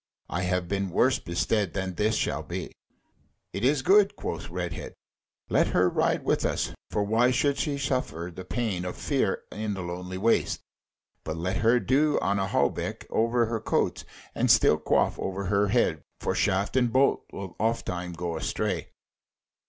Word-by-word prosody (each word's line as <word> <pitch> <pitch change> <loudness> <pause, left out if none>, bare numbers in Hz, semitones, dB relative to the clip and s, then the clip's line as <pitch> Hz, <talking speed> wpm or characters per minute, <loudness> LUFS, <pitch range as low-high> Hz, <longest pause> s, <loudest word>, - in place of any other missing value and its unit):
I 85 - -1
have 90 -1 0
been 100 +1 -1
worse - - +3
bestead 90 +2 0
than 95 -1 -2
this 105 +4 +1
shall - - 0
be." - - -5 0.8
"It 100 - -4
is 135 +1 +3
good," 200 +4 +5
quoth 85 0 -5
Redhead, 90 -2 -5 0.5
"let - - +3
her 90 - +3
ride - - +1
with - - +1
us: - - -1 0.2
for 105 - 0
why 110 +4 +3
should 140 +3 +1
she 145 -2 -1
suffer 125 - -2
the 95 - -7
pain 90 0 -2
of 90 - -4
fear - - 0
in 105 -1 -3
the 95 - -5
lonely 90 +1 -5
waste? 115 +4 +1 0.6
But 80 0 -4
let 95 +4 -1
her 115 +5 +4
do 145 +4 +2
on 100 0 0
a 95 - 0
hauberk - - -1
over 115 +1 +2
her 115 0 -2
coats, - - 0 0.3
and - - 0
steel - - +5
coif - - +1
over 95 +1 -3
her 100 +2 +2
head, 95 - +2 0.2
for - - -1
shaft 95 +5 +1
and 125 -3 +3
bolt 135 +3 +3
will 95 -3 -7
ofttimes 90 -6 -1
go 85 -1 -3
astray." 80 - -2
100 Hz, 170 wpm, -27 LUFS, 90-120 Hz, 0.8 s, good